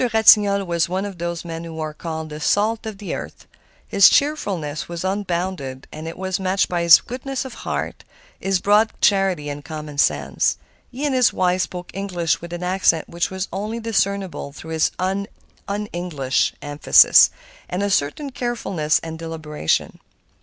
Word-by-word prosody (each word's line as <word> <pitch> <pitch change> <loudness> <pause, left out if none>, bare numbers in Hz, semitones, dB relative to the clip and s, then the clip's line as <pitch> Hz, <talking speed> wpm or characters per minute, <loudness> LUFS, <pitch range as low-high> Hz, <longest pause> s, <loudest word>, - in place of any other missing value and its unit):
Ratignolle 205 -3 +5
was 170 -1 0
one 190 +2 -1
of 195 -4 -7
those 170 0 -4
men 165 0 -6
who 165 -1 -8
are 155 -1 -3
called 160 0 -5
the 150 - -6
salt 215 +7 +1
of 215 -2 -6
the 200 - -5
earth. - - -7 0.4
His 200 -1 +7
cheerfulness 185 - 0
was 170 0 -5
unbounded, 180 -8 -3
and 155 +1 -7
it 165 - -7
was 190 0 -2
matched 190 +1 +1
by 175 -1 -1
his 170 -1 +8
goodness 260 +2 -5
of 260 - -7 0.2
heart, - - -3 0.4
his 195 -1 0
broad 210 +3 +3
charity, 190 -7 +2
and 145 0 -5
common 150 -2 -7
sense. - - +1 0.3
He 265 +4 -4
and 285 - 0
his 255 -2 +4
wife 185 0 +1
spoke 180 0 -5
English 180 -5 -1
with 170 0 -9
an 175 +1 -5
accent 180 -3 +1
which 170 0 -1
was 190 0 -4
only 210 +4 -3
discernible 200 -8 -1
through 160 +2 -10
its 160 -1 +2
un 195 +2 -1 0.7
English 150 -7 -1
emphasis 145 0 +6 0.4
and 180 +3 -2
a 200 - 0
certain 195 - 0
carefulness 205 -12 -1
and 160 0 -6
deliberation. 155 - -2
180 Hz, 165 wpm, -21 LUFS, 160-200 Hz, 0.7 s, his